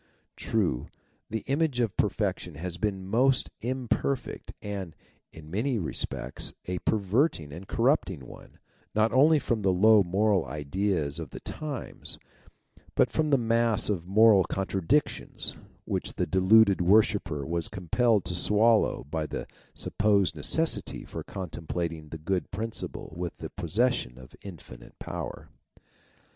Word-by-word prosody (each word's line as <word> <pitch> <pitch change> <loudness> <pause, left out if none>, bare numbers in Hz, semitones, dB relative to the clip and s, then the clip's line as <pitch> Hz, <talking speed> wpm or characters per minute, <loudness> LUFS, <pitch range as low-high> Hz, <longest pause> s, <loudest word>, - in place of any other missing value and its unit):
True, 90 - -1 0.4
the 110 0 -3
image 140 -2 0
of 115 -5 0
perfection - - -1
has 85 +3 -4
been 105 +2 0
a 95 -1 -9
most 125 +6 +2
imperfect, 130 +1 -2
and, 95 -6 -5 0.4
in 80 -1 -12
many 120 +6 0
respects 85 -7 -4
a 90 0 -3
perverting 100 - +1
and 90 +5 -9
corrupting 115 - +1
one, - - -13 0.4
not 110 +1 +3
only 150 +4 +6
from 120 -6 -1
the 95 -1 +3
low 105 +3 +6
moral 95 +1 +2
ideas 75 0 -1
of 80 -4 -6
the - - -8
times, 150 -5 -5 0.8
but - - +3
from 155 -1 +1
the 140 - +5
mass 115 -2 +2
of 90 -4 -3
moral 105 0 +6
contradictions 95 - -1 0.3
which - - -2
the - - 0
deluded 95 +3 +5
worshipper 90 -6 +3
was 85 +1 -1
compelled 100 +4 +1
to 90 - -3
swallow 105 +5 +3
by 75 +2 -3
the - - -5 0.3
sup - - -6
posed 100 -2 +3
necessity 160 0 +1
of - - -16
complimenting 85 -3 -4
the 80 - -6
Good 85 +1 -2
Principle 110 -5 -5
with 85 0 -4
the - - -7
possession 120 - 0
of 65 0 -13
infinite 90 -7 -11
power. - - -6
100 Hz, 135 wpm, -28 LUFS, 85-115 Hz, 0.8 s, only